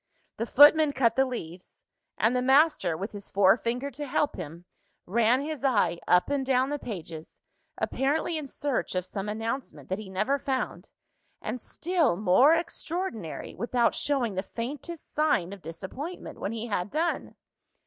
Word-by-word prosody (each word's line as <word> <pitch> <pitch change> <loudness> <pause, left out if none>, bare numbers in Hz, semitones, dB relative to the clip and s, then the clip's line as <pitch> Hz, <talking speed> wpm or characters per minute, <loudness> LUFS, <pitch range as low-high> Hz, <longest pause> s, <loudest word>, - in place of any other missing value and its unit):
The 230 - -2
footman 295 +2 +7
cut 235 -4 +2
the 265 0 +3
leaves; 180 -8 -8 0.3
and 230 +3 +2
the 250 - +2
master, 265 - +3
with 200 +5 -5
his 200 -1 -9
forefinger 235 +7 +2
to 290 +3 -6
help 295 +1 0
him, 170 0 -8 0.4
ran 235 +6 +3
his 305 -2 -5
eye 200 -10 +2
up 180 0 +4
and 280 -1 +1
down 260 +1 +2
the 290 - -2
pages; 170 -9 -8 0.4
apparently 295 +5 0
in 305 -3 -3
search 275 -6 -2
of 180 -1 -1
some 195 +2 -5
announcement 220 - -4
that 190 +2 -2
he 210 -3 -8
never 215 +9 0
found 265 -2 -3 0.5
and, 250 - -5
still 335 - 0
more 215 - +5
extraordinary, 330 - -4
without 240 0 +1
showing 260 -7 0
the 190 - -1
faintest 285 - -7
sign 295 - +1
of 200 - -10
disappointment 190 - -7
when 200 - -3
he 230 0 -4
had 205 -4 -2
done. 325 +6 -1
240 Hz, 160 wpm, -28 LUFS, 195-285 Hz, 0.5 s, footman